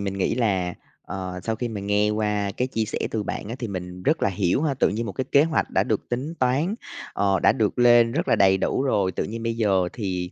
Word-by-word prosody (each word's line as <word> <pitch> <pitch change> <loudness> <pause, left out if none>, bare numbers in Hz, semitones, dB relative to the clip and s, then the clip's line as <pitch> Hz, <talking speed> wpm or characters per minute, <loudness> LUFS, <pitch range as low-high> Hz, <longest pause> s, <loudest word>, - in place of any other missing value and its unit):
mình 100 -1 -3
nghĩ 95 - +1
là, 95 -7 0 0.3
ờ, 90 -1 -6
sau 115 -1 -1
khi 120 +1 -3
mà 105 -3 -5
nghe 105 +1 +1
qua 105 -1 0
cái 125 +1 0
chia 115 -3 -1
sẻ 110 - -4
từ 110 - -1
bạn 100 - -5
á 115 - -4
thì 120 -4 -4
mình 90 -1 -6
rất 155 - +1
là - - +4
hiểu 95 - 0
ha. 145 -4 +1
Tự - - +2
nhiên 110 +3 -2
một 100 - -4
cái 130 - -3
kế 140 - +7
hoạch 160 -2 0
đã - - +2
được - - -2
tính 135 +7 -3
toán, 140 - +1 0.4
ờ, 100 -1 +1
đã - - +5
được 110 +1 -1
lên 120 -1 +6
rất 170 +5 -1
là - - +4
đầy 95 -1 +5
đủ 130 - 0
rồi, 100 -8 +1
tự - - -2
nhiên 115 +1 -5
bây 115 0 -1
giờ 95 -5 +2
thì 90 -5 -3
105 Hz, 260 wpm, -24 LUFS, 95-120 Hz, 0.4 s, kế